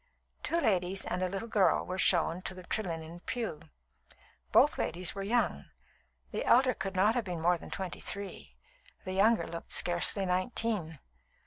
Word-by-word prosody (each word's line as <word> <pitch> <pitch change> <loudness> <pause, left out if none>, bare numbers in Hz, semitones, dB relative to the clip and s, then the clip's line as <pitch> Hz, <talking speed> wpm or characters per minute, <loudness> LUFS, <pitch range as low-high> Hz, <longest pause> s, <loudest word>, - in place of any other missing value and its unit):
Two 335 - 0
ladies 190 - +1
and 180 - -2
a 185 - 0
little 195 +4 -4
girl 200 -6 +2
were 185 +1 -4
shown 175 -1 +2
to 185 - -4
the 185 - -10
Trelinnen 170 -4 -4
pew. 225 -11 -3 0.9
Both - - +4
ladies 180 +1 -1
were 195 - -5
young; 205 - 0 0.7
the - - -2
elder 255 +1 +4
could 195 -2 -5
not 205 +4 +4
have 240 -3 -1
been 175 -3 -4
more 175 +1 +2
than - - -11
twenty 190 -2 -5
three, 185 - -5 0.5
the 185 - -4
younger 220 +4 +3
looked 170 0 -8
scarcely 175 +3 +3
nineteen. 185 -2 -1
185 Hz, 160 wpm, -31 LUFS, 175-210 Hz, 0.9 s, Both